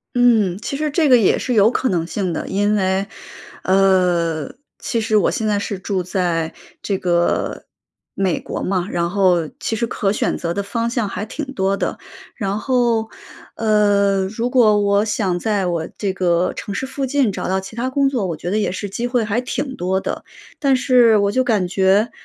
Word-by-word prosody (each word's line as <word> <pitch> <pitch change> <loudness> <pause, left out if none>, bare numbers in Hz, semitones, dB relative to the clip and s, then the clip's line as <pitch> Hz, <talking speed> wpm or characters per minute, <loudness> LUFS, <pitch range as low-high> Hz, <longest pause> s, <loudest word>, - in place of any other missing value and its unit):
嗯， 225 -7 +3
其 235 - -4
实 300 +1 -2
这 315 0 +2
个 255 -2 +7
也 215 -5 +3
是 250 - -2
有 215 +2 +5
可 260 - 0
能 170 -3 0
性 185 0 -2
的。 - - -3
因 205 +2 +1
为， 190 0 0 0.6
呃， 180 -5 +2 0.3
其 235 - -2
实 220 -1 0
我 210 - +3
现 220 - -2
在 210 -1 +1
是 200 -1 -4
住 190 -1 -2
在 170 -3 -1 0.3
这 195 - -1
个 175 -2 0 0.5
美 190 -3 0
国 - - -5
嘛， 185 0 -1
然 170 -3 -1
后 180 -4 +2
其 - - -2
实 235 +1 -1
可 195 -3 -1
选 210 - -1
择 170 0 -3
的 200 - -2
方 230 +4 -2
向 235 -3 -1
还 200 +1 -4
挺 290 +7 -5
多 195 -2 0
的， - - -2 0.4
然 200 -2 -2
后， 235 -4 +1 0.5
呃， 205 -3 +2
如 225 +4 -3
果 230 -5 +4
我 200 +1 +2
想 200 -5 -1
在 205 -2 0
我 170 -2 -2
这 200 -2 -1
个 180 -1 +1
城 200 - -5
市 265 - -2
附 270 +1 -3
近 260 -4 +1
找 - - -4
到 190 +1 0
其 205 +4 -11
它 250 +2 -1
工 275 +1 +2
作， 245 -7 -1
我 170 - -3
觉 175 +3 -5
得 210 - +1
也 205 - 0
是 200 +2 -5
机 235 +5 -3
会 245 -2 +1
还 215 +2 0
挺 260 +2 -4
多 185 +2 0
的。 - - -5 0.3
但 275 -3 +3
是 250 -3 +4
我 200 0 +1
就 255 - +2
感 220 -7 +1
觉， 195 +4 +2
200 Hz, 215 characters per minute, -19 LUFS, 185-235 Hz, 0.6 s, 个